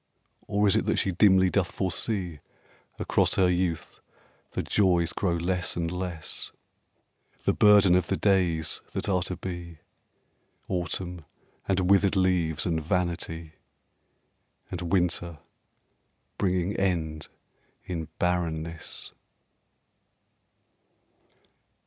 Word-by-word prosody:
Or 105 Hz, +1 st, +2 dB
is 100 Hz, -, +4 dB
it -, -, +1 dB
that -, -, +1 dB
she 95 Hz, -, +1 dB
dimly 95 Hz, 0 st, +5 dB
doth 95 Hz, -4 st, +1 dB
foresee 95 Hz, -3 st, -1 dB, 0.6 s
Across -, -, +2 dB
her 90 Hz, -2 st, +4 dB
youth 90 Hz, -3 st, -2 dB, 0.5 s
the -, -, -2 dB
joys 90 Hz, -4 st, +2 dB
grow 90 Hz, -4 st, 0 dB
less 90 Hz, +1 st, -1 dB
and 85 Hz, -1 st, -2 dB
less 90 Hz, -3 st, -4 dB, 0.9 s
The -, -, +2 dB
burden 105 Hz, -3 st, +6 dB
of 90 Hz, 0 st, +3 dB
the 95 Hz, -, 0 dB
days 90 Hz, -6 st, +1 dB
that -, -, -2 dB
are 95 Hz, -3 st, +2 dB
to 90 Hz, +1 st, -3 dB
be: 85 Hz, -2 st, -7 dB, 0.9 s
Autumn 90 Hz, -1 st, -3 dB, 0.4 s
and 95 Hz, -2 st, +1 dB
withered 100 Hz, 0 st, +4 dB
leaves 90 Hz, -4 st, +1 dB
and 80 Hz, -2 st, 0 dB
vanity, 85 Hz, -1 st, -2 dB, 1.2 s
And 90 Hz, -1 st, -4 dB
winter 85 Hz, -3 st, 0 dB, 1.0 s
bringing 95 Hz, 0 st, 0 dB
end 80 Hz, -5 st, -1 dB, 0.6 s
in 80 Hz, -3 st, -4 dB
barrenness. 85 Hz, -2 st, -2 dB
90 Hz, 105 wpm, -27 LUFS, 85-95 Hz, 1.2 s, burden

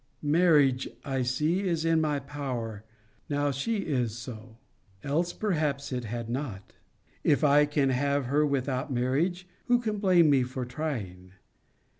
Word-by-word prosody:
Marriage, 145 Hz, -5 st, +3 dB, 0.2 s
I 135 Hz, -2 st, -1 dB
see, 150 Hz, +8 st, +1 dB
is 165 Hz, -2 st, 0 dB
in 165 Hz, -1 st, +3 dB
my 150 Hz, -2 st, +1 dB
power, 130 Hz, -7 st, -5 dB, 0.5 s
now 145 Hz, 0 st, +1 dB
she 200 Hz, -, -1 dB
is 120 Hz, -6 st, -1 dB
so. 115 Hz, -2 st, -9 dB, 0.5 s
Else 165 Hz, +5 st, 0 dB
perhaps 150 Hz, -10 st, -1 dB
it 125 Hz, -2 st, -3 dB
had 115 Hz, +1 st, -4 dB
not. 120 Hz, -6 st, -5 dB, 0.5 s
If 145 Hz, -, +3 dB
I 145 Hz, 0 st, +5 dB
can 145 Hz, -2 st, +1 dB
have 140 Hz, +1 st, 0 dB
her 145 Hz, +4 st, +2 dB
without 140 Hz, 0 st, -1 dB
marriage, 150 Hz, +9 st, 0 dB, 0.2 s
who 245 Hz, -, +4 dB
can 215 Hz, -3 st, -2 dB
blame 180 Hz, -6 st, +5 dB
me 135 Hz, -2 st, +4 dB
for 125 Hz, 0 st, -3 dB
trying? 110 Hz, -, -5 dB
140 Hz, 145 wpm, -28 LUFS, 125-155 Hz, 0.5 s, I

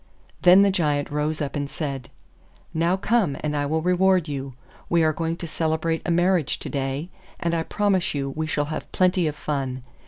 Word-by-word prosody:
Then 185 Hz, +2 st, +8 dB
the 200 Hz, -, +4 dB
Giant 150 Hz, -6 st, 0 dB
rose 150 Hz, +1 st, -1 dB
up 140 Hz, -, -4 dB
and 145 Hz, -1 st, -2 dB
said, 140 Hz, -6 st, -4 dB, 0.6 s
'Now 170 Hz, +3 st, +2 dB
come 195 Hz, -, +1 dB
and 150 Hz, -1 st, -2 dB
I 145 Hz, -1 st, 0 dB
will 160 Hz, +2 st, 0 dB
reward 180 Hz, -1 st, +3 dB
you. 135 Hz, -3 st, -5 dB, 0.3 s
We 170 Hz, -1 st, +3 dB
are 155 Hz, 0 st, +3 dB
going 165 Hz, +2 st, -2 dB
to 170 Hz, -, -6 dB
celebrate 160 Hz, 0 st, -1 dB
a -, -, 0 dB
marriage 175 Hz, -2 st, +2 dB
to -, -, -7 dB
day, 140 Hz, +5 st, -3 dB, 0.3 s
and 170 Hz, -1 st, -1 dB
I 165 Hz, -, +1 dB
promise 190 Hz, -1 st, 0 dB
you 135 Hz, -1 st, -2 dB
we 155 Hz, +3 st, -3 dB
shall 145 Hz, -1 st, 0 dB
have -, -, -6 dB
plenty 185 Hz, -2 st, +2 dB
of 150 Hz, -, -2 dB
fun. 135 Hz, -4 st, -3 dB
160 Hz, 195 wpm, -24 LUFS, 145-175 Hz, 0.6 s, Then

